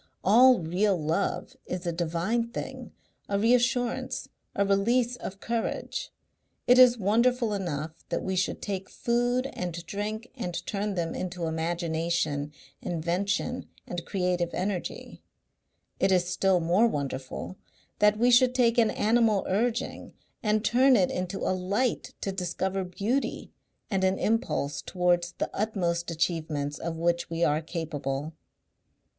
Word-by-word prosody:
All 245 +6 +7
real 185 +4 +1
love 165 - -1
is 180 0 -4
a 170 - 0
divine 175 +8 -1
thing, - - -6 0.4
a 200 - +1
reassurance, 245 +2 +1 0.3
a 200 - +2
release 230 +5 +2
of 195 -5 -7
courage. 230 0 -3 0.6
It 250 +1 +6
is 250 -1 +8
wonderful 230 +3 +2
enough 165 -4 -4
that - - -1
we 190 - -1
should 185 0 -1
take 195 -2 -4
food 245 +2 0
and 175 -1 -5
drink 215 +5 -4
and 180 -8 -4
turn 205 0 -2
them 165 -2 -1
into 180 -2 -4
imagination, 160 -2 -1 0.3
invention 180 +9 -2 0.2
and 175 -1 -5
creative 180 -2 0
energy; 185 -1 -4 0.8
it 195 - +3
is 180 -1 +3
still 185 0 +2
more 175 +8 +3
wonderful 140 - -4 0.4
that 210 0 +5
we 240 +3 +4
should 250 +1 +5
take 240 -2 +3
an 225 -2 +4
animal 220 -2 +2
urging 225 +5 -1 0.3
and 215 0 +1
turn 260 +2 +5
it 190 -5 +3
into 180 +1 -3
a - - +2
light 200 +7 -1
to 195 - -1
discover 190 +1 -2
beauty 205 +9 -2 0.4
and 190 -1 +1
an 190 0 +2
impulse 215 - 0
towards 175 -1 +1
the - - -3
utmost 175 -5 -1
achievements 155 -3 -1
of 165 0 -4
which 170 +1 0
we 165 0 -1
are 150 -1 +2
capable. 150 -3 -4
190 Hz, 135 wpm, -28 LUFS, 170-225 Hz, 0.8 s, is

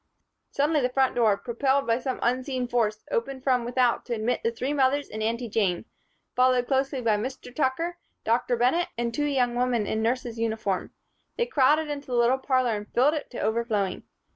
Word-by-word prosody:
Suddenly 295 +1 +1
the 250 - +1
front 265 +1 +2
door, 220 -4 +3
propelled 265 +4 0
by 230 +1 +1
some 260 0 -3
unseen 255 +1 0
force, 220 -3 0
opened 275 - -2
from 255 -3 +2
without 245 0 +1
to 240 - -1
admit 230 +3 -1
the - - +1
three 250 +5 -3
mothers 280 0 +2
and 215 - -6
Aunty 230 +2 -1
Jane, 200 -4 0 0.5
followed 255 -1 +3
closely 270 0 0
by 220 -2 +3
Mr. 250 +2 -6
Tucker, 330 +5 -1 0.2
Dr. 235 +2 +1
Bennett 260 +9 +2
and 235 0 -1
two 295 +4 0
young 255 -4 +1
women 240 -3 +1
in 220 +2 -1
nurses' 235 0 -1
uniform. 220 -4 -1 0.5
They 475 - +1
crowded 305 - +3
into 290 -1 -5
the 250 - -2
little 240 +2 +3
parlor 255 -4 +1
and 210 0 -7
filled 270 +5 +3
it 300 -3 -4
to 245 - -6
overflowing. 215 -3 -1
250 Hz, 190 wpm, -26 LUFS, 230-270 Hz, 0.5 s, door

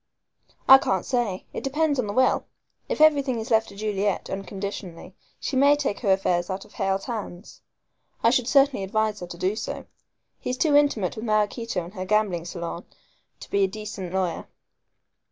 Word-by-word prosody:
"I 265 0 +10
can't 190 -8 -1
say. 235 -7 -1
It - - -5
depends 290 +1 +1
upon 235 - 0
the 205 - -3
will. 255 +3 +2 0.4
If - - -2
everything 285 -5 +4
is 225 +3 -6
left 220 0 +3
to 200 - -13
Juliet, 205 -1 -1
unconditionally, 195 -2 -6 0.3
she 275 - -3
may 280 +2 +6
take 280 -8 -2
her 200 - +1
affairs 180 -2 +1
out 190 +1 -4
of - - -20
Hale's 195 0 -1
hands. 210 -5 -7 0.6
I 230 - +5
should 250 -2 +1
certainly 275 -4 +4
advise 215 +2 0
her 180 - -7
to 175 - -9
do 185 +4 0
so. 220 - -5 0.5
He's 250 - -3
too 300 0 +3
intimate 280 - +2
with 220 - -5
Maraquito 215 -2 0
and 175 +3 -11
her 185 -2 -5
gambling 195 -4 +1
salon 170 0 -6 0.6
to - - -10
be 200 0 +3
a - - +4
decent 205 -3 -7
lawyer." 185 -2 -2
210 Hz, 180 wpm, -25 LUFS, 190-250 Hz, 0.6 s, I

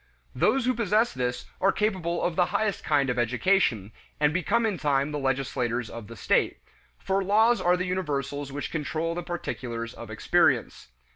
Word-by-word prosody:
Those 265 -2 +2
who 255 - +2
possess 225 0 +1
this 125 -1 -2 0.2
are 195 - +4
capable 185 -6 -1
of 175 - 0
the 180 0 +3
highest 205 +2 -1
kind 145 -3 +2
of 125 - -2
education, 120 - +1 0.3
and 150 0 +3
become 205 +7 +1
in 205 -5 -1
time 140 -1 +1
the 150 - -2
legislators 125 -3 -1
of 115 -3 -8
the 115 - -10
state 100 - +1 0.4
for 195 0 -1
laws 220 +5 +3
are 180 +1 +3
the 180 - -2
universals 145 -6 -2
which 145 +1 -5
control 160 +1 -2
the 175 - -3
particulars 120 -9 -5
of - - -10
experience. - - +1
160 Hz, 170 wpm, -27 LUFS, 130-190 Hz, 0.4 s, are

